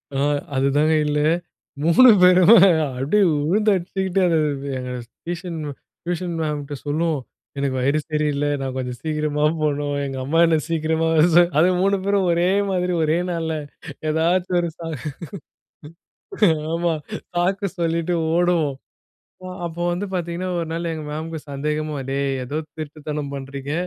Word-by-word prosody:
அ. -, -, 0 dB, 0.4 s
அதுதாங்க 145 Hz, +4 st, +2 dB
இல்ல. 150 Hz, 0 st, 0 dB, 0.7 s
3 240 Hz, +10 st, +7 dB
பேரு 180 Hz, 0 st, +7 dB, 0.6 s
அப்டியே 155 Hz, +11 st, +2 dB
வுழுந்து 180 Hz, +9 st, +2 dB
அடிச்சுக்கிட்டு, 190 Hz, +1 st, -2 dB
அது 165 Hz, -2 st, +2 dB, 0.4 s
எங்க 125 Hz, 0 st, -5 dB, 0.3 s
டியூஷன் 175 Hz, -1 st, -5 dB, 0.4 s
டியூஷன் 175 Hz, 0 st, -3 dB
மேம்ட்ட 150 Hz, -2 st, -3 dB
சொல்லுவோம். 155 Hz, +1 st, 0 dB, 0.4 s
எனக்கு 140 Hz, -1 st, -1 dB
வயிறு 140 Hz, +4 st, +2 dB
சரியில்ல 150 Hz, -1 st, 0 dB
நான் 130 Hz, -1 st, -3 dB
கொஞ்சம் 125 Hz, -1 st, -4 dB
சீக்கிரமா 150 Hz, -1 st, -1 dB, 0.2 s
போணும், 145 Hz, -1 st, 0 dB
எங்க 135 Hz, -1 st, -5 dB
அம்மா 155 Hz, +5 st, +1 dB
என்ன 165 Hz, -1 st, +3 dB
சீக்கிரமா 160 Hz, 0 st, 0 dB
வரச 170 Hz, +2 st, +6 dB
அது 170 Hz, +3 st, +5 dB
3 200 Hz, +1 st, +3 dB
பேரும் 200 Hz, -1 st, +1 dB
ஒரே 170 Hz, +1 st, +2 dB, 0.2 s
மாதிரி, 180 Hz, -1 st, 0 dB
ஒரே 155 Hz, +2 st, +2 dB
நாள்ல. 165 Hz, -2 st, -2 dB, 0.6 s
ஏதாச்சும் 175 Hz, +3 st, +1 dB
ஒரு 170 Hz, -, -2 dB
சா 165 Hz, -, -7 dB, 1.9 s
ஆமா, 170 Hz, 0 st, +1 dB, 0.4 s
சாக்கு 190 Hz, +3 st, +1 dB
சொல்லிட்டு 170 Hz, +1 st, 0 dB, 0.2 s
ஓடுவோம். 170 Hz, -5 st, +2 dB, 0.7 s
ப 185 Hz, -, -8 dB, 0.2 s
அப்ப 165 Hz, 0 st, -7 dB
வந்து 180 Hz, +4 st, -2 dB
பார்த்தீங்கன்னா, 175 Hz, +1 st, -3 dB
1 165 Hz, -, -3 dB
நாள் 170 Hz, 0 st, -2 dB
எங்க 155 Hz, -, -6 dB
மேம்க்கு 160 Hz, +1 st, -5 dB
சந்தேகமா, 150 Hz, +2 st, -2 dB
டேய்! 140 Hz, 0 st, 0 dB
ஏதோ 145 Hz, +5 st, -4 dB, 0.2 s
திருட்டுத்தனம் 150 Hz, -1 st, -5 dB
பண்றீங்க. 135 Hz, +1 st, -6 dB
160 Hz, 135 wpm, -22 LUFS, 145-175 Hz, 1.9 s, 3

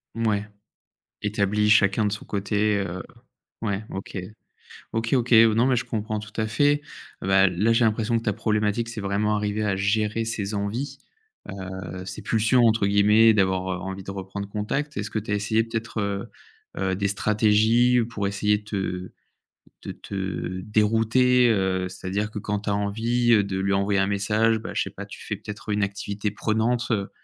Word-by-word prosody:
Mouais. 110 Hz, -3 st, 0 dB, 0.8 s
Établi 105 Hz, 0 st, +1 dB
chacun 105 Hz, 0 st, +4 dB
de 105 Hz, -, 0 dB
son 105 Hz, -, -6 dB
côté, 105 Hz, +1 st, 0 dB
heu, 95 Hz, -2 st, -3 dB, 0.6 s
ouais, 100 Hz, -1 st, -2 dB
OK. 95 Hz, 0 st, -6 dB, 0.8 s
OK, 115 Hz, +2 st, -1 dB
OK. 125 Hz, -2 st, +1 dB
Non 115 Hz, +2 st, +6 dB
mais 130 Hz, -, +3 dB
je 125 Hz, -, -1 dB
comprends 110 Hz, -2 st, -3 dB
tout 105 Hz, 0 st, -10 dB
à 110 Hz, -, 0 dB
fait. 145 Hz, +7 st, +2 dB, 0.4 s
Bah, 95 Hz, 0 st, +4 dB
là, 95 Hz, +6 st, +1 dB
j'ai 115 Hz, 0 st, +3 dB
l'impression 110 Hz, +1 st, +1 dB
que 115 Hz, -, -4 dB
ta 105 Hz, -, 0 dB
problématique, 105 Hz, +2 st, 0 dB
c'est 115 Hz, -2 st, -6 dB
vraiment 100 Hz, +2 st, 0 dB
arriver 105 Hz, +1 st, -1 dB
à 100 Hz, -2 st, 0 dB
gérer 105 Hz, +3 st, 0 dB
ces 105 Hz, -2 st, -3 dB
envies, 105 Hz, +8 st, -3 dB, 0.5 s
heu, 95 Hz, -1 st, -7 dB
ces 95 Hz, -, -7 dB
«pulsions» 115 Hz, +2 st, +3 dB
entre 110 Hz, -3 st, +3 dB
guillemets 105 Hz, +3 st, +5 dB
d'avoir, 95 Hz, -2 st, +1 dB
heu, 95 Hz, -, -1 dB
envie 95 Hz, 0 st, -6 dB
de 95 Hz, -, -6 dB
reprendre 100 Hz, +1 st, -6 dB
contact. 135 Hz, +8 st, -3 dB
Est-ce 105 Hz, +1 st, -3 dB
que 110 Hz, -, -1 dB
tu 105 Hz, -, -11 dB
as -, -, +2 dB
essayé 110 Hz, +2 st, +1 dB
peut-être, 115 Hz, 0 st, -4 dB
heu 100 Hz, -1 st, -3 dB, 0.5 s
heu, 95 Hz, -1 st, 0 dB
des 100 Hz, 0 st, -1 dB
stratégies 110 Hz, +4 st, +3 dB
pour 100 Hz, -4 st, -2 dB
essayer 105 Hz, +1 st, +1 dB
de -, -, -20 dB
te 95 Hz, -3 st, -4 dB, 0.7 s
de -, -, -5 dB
te 95 Hz, -1 st, -4 dB
dérouter? 115 Hz, +4 st, +3 dB
Heu, 95 Hz, -3 st, +1 dB
c'est-à-dire 100 Hz, +3 st, -3 dB
que 105 Hz, -, -5 dB
quand 105 Hz, 0 st, -3 dB
tu 105 Hz, -, -4 dB
as 100 Hz, -, +1 dB
envie, 115 Hz, +4 st, 0 dB
heu, 105 Hz, -, +5 dB
de 95 Hz, -1 st, -3 dB
lui 100 Hz, +1 st, 0 dB
envoyer 100 Hz, 0 st, +1 dB
un 95 Hz, -, +2 dB
message, 105 Hz, +3 st, +2 dB
bah -, -, -7 dB
je -, -, 0 dB
sais -, -, -2 dB
pas, -, -, -8 dB
tu -, -, -11 dB
fais -, -, -3 dB
peut-être 105 Hz, +1 st, -9 dB
une 105 Hz, 0 st, +1 dB
activité 100 Hz, +1 st, -3 dB
prenante, 110 Hz, +3 st, 0 dB
heu 100 Hz, -3 st, 0 dB
105 Hz, 185 wpm, -24 LUFS, 100-110 Hz, 0.8 s, Non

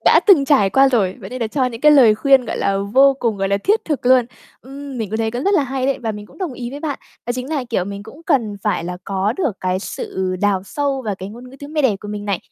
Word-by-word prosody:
Đã -, -, +6 dB
từng 360 Hz, -9 st, +6 dB
trải 270 Hz, -9 st, +3 dB
qua 270 Hz, +4 st, +5 dB
rồi, 205 Hz, -8 st, +1 dB
vậy -, -, -9 dB
nên 255 Hz, 0 st, -6 dB
là 230 Hz, -, 0 dB
cho 260 Hz, +3 st, -1 dB
những 235 Hz, -2 st, -4 dB
cái 300 Hz, +1 st, +6 dB
lời 245 Hz, -7 st, +6 dB
khuyên, 270 Hz, +2 st, +4 dB
gọi -, -, -4 dB
là, 195 Hz, 0 st, 0 dB
vô 265 Hz, +8 st, +4 dB
cùng, 230 Hz, -5 st, -1 dB
gọi 195 Hz, 0 st, -1 dB
là, 200 Hz, -, +2 dB
thiết 415 Hz, -, +2 dB
thực 290 Hz, -5 st, -3 dB
luôn. 255 Hz, -1 st, +5 dB, 0.4 s
Ừm, 275 Hz, -1 st, -9 dB
mình 215 Hz, -4 st, -4 dB
cũng 220 Hz, -, -2 dB
thấy 225 Hz, 0 st, 0 dB
cũng 245 Hz, +3 st, -4 dB
rất 400 Hz, -, +3 dB
là 305 Hz, -, +3 dB
hay 265 Hz, -1 st, -2 dB
đấy 275 Hz, -, 0 dB
và 225 Hz, -2 st, -1 dB
mình 210 Hz, 0 st, -9 dB
cũng -, -, -19 dB
đồng 365 Hz, -7 st, -3 dB
ý 245 Hz, -1 st, -6 dB
với 285 Hz, -, -8 dB
bạn. 295 Hz, -3 st, -3 dB, 0.3 s
Đó 240 Hz, -, 0 dB
chính 255 Hz, +2 st, -5 dB
là, 290 Hz, -5 st, -1 dB
kiểu, 185 Hz, -5 st, 0 dB
mình 200 Hz, 0 st, -6 dB
cũng 245 Hz, +10 st, -13 dB
cần 230 Hz, -, +1 dB
phải 205 Hz, -5 st, -1 dB
là 180 Hz, +1 st, -4 dB
có 195 Hz, +2 st, -1 dB
được 310 Hz, -, 0 dB
cái 185 Hz, 0 st, 0 dB
sự 190 Hz, -1 st, -4 dB
đào 200 Hz, -2 st, +1 dB
sâu 275 Hz, +4 st, -2 dB
vào 210 Hz, -2 st, -2 dB
cái 190 Hz, 0 st, -8 dB
ngôn 245 Hz, +4 st, -11 dB
ngữ 270 Hz, -, -13 dB
tiếng 285 Hz, +2 st, -9 dB
mẹ 305 Hz, -1 st, 0 dB
đẻ 235 Hz, -7 st, +2 dB
của 210 Hz, -, -9 dB
mình 205 Hz, 0 st, -5 dB
này. 200 Hz, -3 st, -1 dB
245 Hz, 300 wpm, -19 LUFS, 205-275 Hz, 0.4 s, Đã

